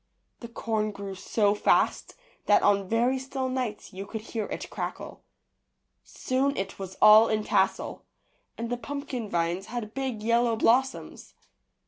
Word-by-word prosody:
The 235 - -8
corn 220 -2 -2
grew 200 -1 -7
so 205 +2 +1
fast 210 - +1 0.3
that - - +5
on 200 -2 +2
very 245 +4 +2
still 265 0 -3
nights 250 -7 -4
you 195 +1 -7
could 220 +1 -5
hear 220 -1 -4
it - - -5
crackle. - - -6 0.8
Soon 270 +2 -1
it 195 0 -4
was 190 -1 -7
all 215 +1 +9
in 215 -1 0
tassel, - - 0 0.5
and 230 +1 -4
the 245 - -1
pumpkin 255 -2 -5
vines 170 +2 -1
had 220 -2 -5
big 260 -6 -3
yellow 235 +1 +2
blossoms. 255 +4 0
225 Hz, 145 wpm, -27 LUFS, 205-250 Hz, 0.8 s, all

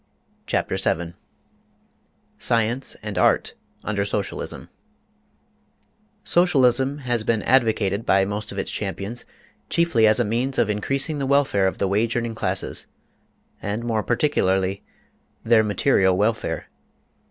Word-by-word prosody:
CHAPTER - - -1
VII 85 0 0 1.3
SCIENCE 115 +3 0
AND - - -3
ART - - +2 0.3
UNDER 100 -1 -1
SOCIALISM 100 0 -4 1.6
SOCIALISM 135 -6 +3
has 120 -3 0
been 110 -1 0
advocated 110 -5 +2
by 95 -2 +3
most 105 +2 -4
of - - -8
its - - -2
champions 110 +5 -5 0.4
chiefly 165 -10 +3
as 110 +1 +4
a 120 - +2
means 120 +5 -1
of 110 - +2
increasing 135 +8 -1
the 135 - -2
welfare 135 -9 +3
of 95 - -3
the 100 - 0
wage 110 +4 0
earning 120 -1 -1
classes, 95 -3 -1 0.7
and 105 +3 -3
more 110 -2 0
particularly 95 -7 +1 0.6
their 115 -1 +4
material 95 -2 +2
welfare. 110 +2 -1
110 Hz, 120 wpm, -23 LUFS, 100-125 Hz, 1.6 s, as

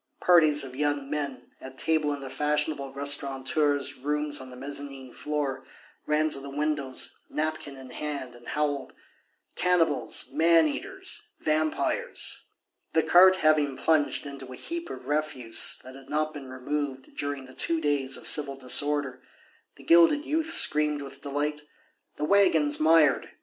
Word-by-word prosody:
Parties 155 -5 +4
of 130 -1 -9
young 145 0 -2
men, 140 -4 -5
at 130 0 -11
table 155 -2 +1
in 145 -1 -5
the 135 - -7
fashionable 150 -1 -1
restaurateurs' 140 +1 +1
rooms 150 +1 -1
on 130 - -10
the 125 - -11
mezzanine 135 -1 -6
floor, 145 -3 -3 0.4
ran 155 +1 +1
to 140 - -2
the 140 +1 -9
windows, 145 -2 -2
napkin 155 -2 -4
in 130 -1 -11
hand, 145 -4 -5
and 120 0 -16
howled: 145 -2 -2 0.6
"Cannibals, 180 -2 +1
man 165 0 +4
eaters, 390 - -5
vampires!" 155 0 -2 0.5
The 160 - +2
cart 185 +2 +6
having 150 -3 +2
plunged 155 -3 +1
into 140 -2 -9
a - - -8
heap 340 - -6
of - - -9
refuse 145 -6 -1
that 130 - -11
had 135 0 -14
not 155 +1 -1
been 140 -3 -9
removed 130 +1 -5
during 145 -2 -4
the 130 - -14
two 165 +4 +3
days 145 -3 +1
of - - -11
civil 140 -2 +3
disorder, 140 +1 0 0.5
the - - -16
gilded 170 - +4
youth 320 +1 -1
screamed 150 - +5
with 135 0 -11
delight: 150 +1 -3 0.6
"The 150 - -2
waggon's 160 -6 +3
mired.... 155 -3 +3
145 Hz, 150 wpm, -26 LUFS, 135-155 Hz, 0.6 s, cart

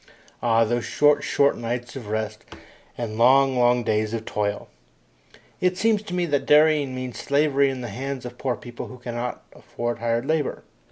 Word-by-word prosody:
Ah, 115 -1 +3
those 120 +1 -1
short, 145 -1 +3
short 140 0 +2
nights 120 +2 -4
of 125 -6 -7
rest 110 +1 -3 0.5
and 110 -2 -4
long, 135 +2 +5
long 120 0 +3
days 110 0 0
of 110 -1 -5
toil! 105 -1 -2 0.9
It 180 0 +1
seems 220 +1 +2
to 205 -4 -6
me 180 -1 +1
that 145 -4 -1
dairying 150 -3 +4
means 130 -3 -5
slavery 140 -1 +2
in 130 -1 -4
the 120 - -5
hands 130 +4 -5
of 125 0 -9
poor 130 -3 -1
people 120 -1 -8
who 125 - -10
cannot 120 0 -5
afford 120 0 -5
hired 115 +1 0
labour. 155 -1 -1
125 Hz, 175 wpm, -24 LUFS, 115-140 Hz, 0.9 s, long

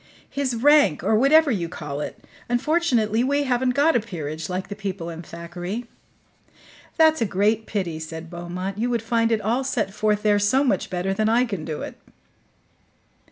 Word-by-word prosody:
"His 270 -3 -1
rank, 285 - +4
or - - +2
whatever 285 +5 +5
you 175 -7 -1
call 150 -3 -5
it. - - -7 0.2
Unfortunately 245 -5 +1
we 285 +2 +1
haven't 250 -1 +1
got 305 +3 +4
a - - +5
PEERAGE, 160 -7 -6
like 185 +1 -3
the 205 - -6
people 190 -5 -5
in 165 0 -7
Thackeray." 175 +7 -6 1.1
"That's 315 -3 +5
a - - +3
great 210 +3 +1
pity," 175 -7 -3
said 160 +1 -7
Beaumont. 180 +3 -5
"You 240 +2 0
would 235 -2 -1
find 230 0 +1
it 220 -2 +1
all 235 +6 0
set 215 -7 -1
forth 210 0 0
there 205 -1 +3
so 220 +7 +3
much 220 -9 0
better 185 +1 -1
than 215 +2 +1
I 240 +3 +3
can 195 -9 -4
do 155 -2 -4
it." - - -8
215 Hz, 180 wpm, -23 LUFS, 180-245 Hz, 1.1 s, whatever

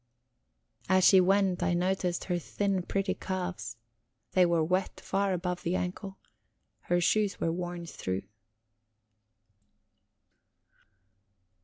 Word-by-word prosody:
As 185 0 +4
she 190 0 +7
went, 190 -1 +2
I 175 - +1
noticed 180 0 0
her 175 -2 -1
thin, 195 +2 -1
pretty 195 +2 -1
calves; 180 - -4 0.5
they 180 -1 +4
were 170 -2 +2
wet 185 +4 -1
far 195 0 0
above 180 0 -2
the 175 +2 -1
ankle. 190 +2 -4 0.6
Her 175 0 0
shoes 205 +3 +1
were 165 - 0
worn 175 0 -4
through. 95 - -4
180 Hz, 110 wpm, -30 LUFS, 175-190 Hz, 0.6 s, she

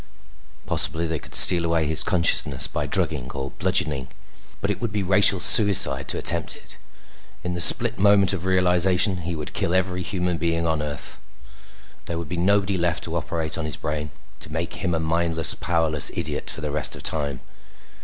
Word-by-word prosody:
Possibly 80 +2 -2
they 80 -2 -4
could - - -14
steal 85 -2 +8
away 85 -1 0
his 80 +2 +2
consciousness 90 -5 0
by - - -4
drugging 65 +1 -2
or 70 0 -6
bludgeoning, 85 -8 -1 0.5
but - - -2
it - - -6
would 115 -3 -3
be 100 -1 -3
racial 95 +1 +3
suicide 100 +1 +4
to - - -3
attempt 85 -2 +2
it. - - -13 0.7
In 90 0 -4
the 90 - -5
split 120 +6 +6
moment 100 -1 +3
of 95 -1 -5
realization 90 +1 +2
he 85 0 -5
would 75 -1 -8
kill 85 - -1
every 90 -1 -1
human 90 -2 -3
being 85 +1 -1
on 80 -2 -1
Earth. 75 -1 -6 0.9
There 85 - -4
would 85 -3 -7
be 90 - -4
nobody 100 +1 0
left 85 -1 -1
to 85 - -5
operate 85 0 -4
on 80 - -4
his 75 -4 -6
brain, 75 -1 -5 0.3
to 75 - -12
make 80 +3 -4
him 90 -2 -1
a - - -2
mindless, 80 0 0
powerless 80 -4 0
idiot - - -4
for - - -4
the 75 -1 -4
rest 75 0 -2
of - - -11
time. 70 -4 -2
85 Hz, 185 wpm, -22 LUFS, 80-95 Hz, 0.9 s, steal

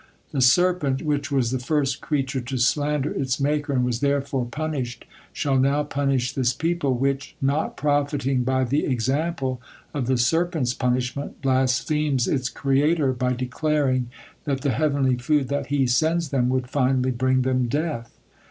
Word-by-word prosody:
The 135 - -1
serpent, 145 0 +3
which 145 -2 -1
was 130 -4 +1
the 130 - -1
first 140 +1 0
creature 135 -3 -1
to 130 +2 -4
slander 145 +3 +1
its 130 -1 -1
Maker 145 +1 0
and 125 -2 +2
was 120 -2 -1
therefore 140 -2 0
punished, 135 -4 -4 0.3
shall 135 -3 0
now 140 +3 +2
punish 135 -4 -1
this 125 -2 +1
people, 160 -5 0
which, 135 +2 -1
not 140 +3 -1
profiting 140 -3 0
by 130 +1 +1
the 135 +4 0
example 130 +1 -1 0.3
of 135 -5 -2
the 130 -1 +2
serpent's 160 0 +1
punishment, 125 +2 -2
blasphemes 135 +1 +1
its 130 -2 0
Creator 140 +1 +1
by 125 0 0
declaring 130 0 0 0.4
that 135 -2 -1
the 140 - +1
heavenly 140 -4 +1
food 135 +2 +1
that 140 -1 -2
He 140 -2 +1
sends 160 +6 +1
them 125 -3 +1
would 130 -1 0
finally 130 -1 +1
bring 130 +1 +1
them 130 -1 +1
death." 145 -3 -3
135 Hz, 155 wpm, -24 LUFS, 130-145 Hz, 0.4 s, serpent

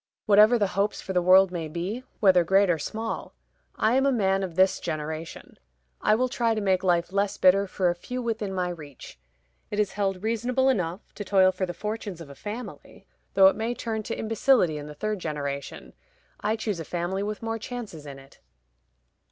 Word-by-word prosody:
Whatever 215 +3 +6
the 205 -4 +1
hopes 200 +2 0
for 190 - -5
the 180 - +2
world 185 +1 +6
may 170 -3 -4
be 180 +10 -4 0.2
whether 185 -4 +5
great 195 +2 +4
or 165 - 0
small 220 +9 -5 0.4
I 220 +2 +2
am 270 +1 +3
a - - +3
man 195 -5 +1
of 185 -4 -4
this 190 +1 +3
generation; 155 +1 -6 0.4
I 215 - +4
will 255 +3 +1
try 235 -3 0
to - - -1
make 190 -3 +1
life 175 0 +1
less 200 0 0
bitter 195 +2 +4
for 185 -1 0
a 175 - +2
few 250 +8 -6
within 225 -4 -2
my 180 -2 -1
reach. 145 - -10 0.5
It 205 - -3
is 210 -2 +1
held 195 -2 -2
reasonable 245 +4 +1
enough 180 -6 -2
to 205 - -6
toil 190 -1 +4
for 185 0 -3
the 175 - -4
fortunes 210 -2 -5
of 155 -4 -10
a - - -9
family, 205 - -8 0.3
though 195 0 +7
it 190 - +6
may 230 +2 -2
turn 220 -2 -3
to 225 - -5
imbecility 220 - +2
in 145 - -8
the 150 - -9
third 215 +4 -3
generation. 140 -4 -5 0.5
I 215 +2 0
choose 215 -5 -3
a - - -4
family 175 +4 -3
with 210 +2 -4
more 225 0 -2
chances 215 -11 -7
in 140 -1 -8
it." 135 0 -17
195 Hz, 200 wpm, -26 LUFS, 175-220 Hz, 0.5 s, though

